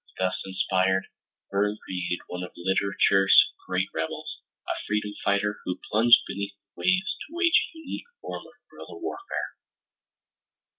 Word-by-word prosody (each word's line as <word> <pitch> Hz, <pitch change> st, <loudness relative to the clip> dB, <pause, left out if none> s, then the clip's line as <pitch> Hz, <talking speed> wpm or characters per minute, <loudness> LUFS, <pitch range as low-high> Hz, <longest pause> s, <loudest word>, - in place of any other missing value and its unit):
Thus 95 Hz, 0 st, 0 dB
inspired, 95 Hz, 0 st, +1 dB, 0.5 s
Verne 105 Hz, +2 st, +1 dB
created 90 Hz, -1 st, -2 dB
one 90 Hz, 0 st, -6 dB
of 90 Hz, -, -7 dB
literature's 95 Hz, +1 st, +4 dB
great 95 Hz, +1 st, 0 dB
rebels, 80 Hz, 0 st, -4 dB, 0.3 s
a -, -, -1 dB, 0.2 s
freedom 105 Hz, 0 st, -1 dB
fighter 105 Hz, +1 st, +1 dB
who 90 Hz, -, -3 dB
plunged 115 Hz, +3 st, +7 dB
beneath 100 Hz, 0 st, -4 dB
the 100 Hz, 0 st, -16 dB
waves 185 Hz, 0 st, +2 dB
to 320 Hz, -, -10 dB
wage 345 Hz, -1 st, +4 dB
a -, -, -12 dB
unique 320 Hz, +7 st, -7 dB
form -, -, -7 dB
of -, -, -18 dB, 0.2 s
guerilla 415 Hz, -, -10 dB
warfare. 390 Hz, +1 st, -5 dB
100 Hz, 140 wpm, -26 LUFS, 95-115 Hz, 0.5 s, plunged